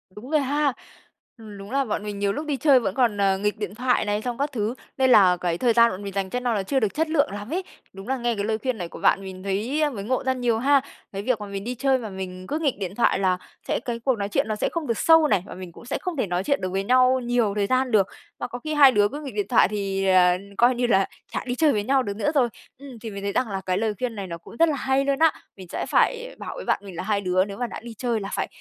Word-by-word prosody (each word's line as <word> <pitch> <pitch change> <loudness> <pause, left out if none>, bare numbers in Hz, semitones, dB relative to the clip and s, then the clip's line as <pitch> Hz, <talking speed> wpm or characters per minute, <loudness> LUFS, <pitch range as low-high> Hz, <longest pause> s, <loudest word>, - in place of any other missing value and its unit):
Đúng 235 +5 -10
rồi 305 -2 +3
ha. 285 +1 +1 0.6
Ừm, 215 -3 -11
đúng 195 +2 -10
là 275 0 +1
bọn 210 -2 -3
mình 205 -1 -5
nhiều 200 0 +1
lúc 300 - -4
đi 290 -2 -1
chơi 275 -2 +5
vẫn 195 -5 -3
còn, 230 -6 +2
à, 195 -1 +3
nghịch 210 +2 -1
điện 205 -2 -5
thoại 250 -1 +1
này 205 0 -1
xong 245 0 -4
các 285 +1 -1
thứ, 220 -3 -1 0.2
nên 260 -1 +3
là 185 -6 +6
cái 170 -1 -1
thời 235 +4 +2
gian 235 0 +5
bọn 185 +2 -7
mình 200 -1 -6
dành 195 -1 -2
cho 250 - -2
no 245 -1 0
là 200 -3 -1
chưa 265 +8 0
được 215 -5 0
chất 320 +1 0
lượng 285 - +2
lắm 205 +2 -7
ấy, 370 +2 -1 0.3
đúng 195 +2 -10
là 265 +1 0
nghe 240 -1 -1
cái 200 - -2
lời 220 0 0
khuyên 255 +1 -2
này 175 -4 -4
của - - -10
bạn - - +3
mình 190 -1 -9
thấy 215 +10 -1
mới 205 -6 -6
ngộ 255 +4 -1
ra 260 0 +1
nhiều 240 -3 0
ha. 280 +2 +4 0.3
Cái 195 - -3
việc 240 +1 0
mà - - -4
mình 200 0 -5
đi 245 +3 -4
chơi 270 +1 +2
mà 230 -4 -6
mình 185 -1 -7
cứ 300 - -2
nghịch 285 -9 0
điện 190 -1 -4
thoại 235 - +2
là 185 -2 +2 0.3
sẽ - - 0
cái 235 -1 -3
cuộc 260 +2 +1
nói 200 -1 -3
chuyện 205 - 0
nó 215 - -1
sẽ 210 - -1
không 330 -3 -3
được 230 - 0
sâu 325 -1 +5
này, 200 -10 +2
và - - -9
mình 185 -1 -8
cũng 200 - -14
sẽ - - -2
không 360 -4 -4
thể 240 - 0
nói 180 +1 -1
chuyện 280 +6 0
được 185 - -2
với 195 +1 -1
nhau 255 +3 +4
nhiều 240 -4 +1
thời 205 -1 0
gian 255 +1 +1
được. 200 -4 +4 0.3
Mà - - -3
có 245 0 -7
khi 310 +5 -4
hai 285 -3 +7
đứa 205 -4 +3
cứ 290 +8 -7
nghịch 280 -3 -7
điện 410 -2 -1
thoại 245 - +5
thì, 195 -1 -2
ờ, 180 -1 +5 0.2
coi 245 +1 +4
như 245 0 0
là 195 -4 +3 0.3
chả - - -2
đi 245 -1 -2
chơi 310 +1 +4
với 210 -4 0
nhau 265 +3 +2
được 200 -4 -4
nữa 295 +7 0
rồi. 250 -4 +3 0.3
Ừm, 270 -4 -11
thì 225 - -6
mình 200 0 -7
thấy 200 - -1
rằng 250 +2 0
là 195 -1 -3
cái 185 0 0
lời 220 +1 0
khuyên 250 -3 -2
này 200 -2 -5
nó 170 -1 -6
cũng 170 - -14
rất 330 +4 +5
là 300 - 0
hay 265 +1 +1
luôn 275 -1 0
á, 320 -1 +6 0.3
mình 185 -2 -10
sẽ - - -3
phải - - +1
bảo - - -6
với - - -7
bạn - - +1
mình 195 -3 -9
là 175 - -4
hai 205 0 0
đứa 185 0 +2
nếu 200 -1 -8
mà 245 - -2
đã - - -7
đi 235 0 -9
chơi 240 -3 0
là 195 -1 -5
phải - - -1
225 Hz, 315 wpm, -24 LUFS, 200-260 Hz, 0.6 s, hai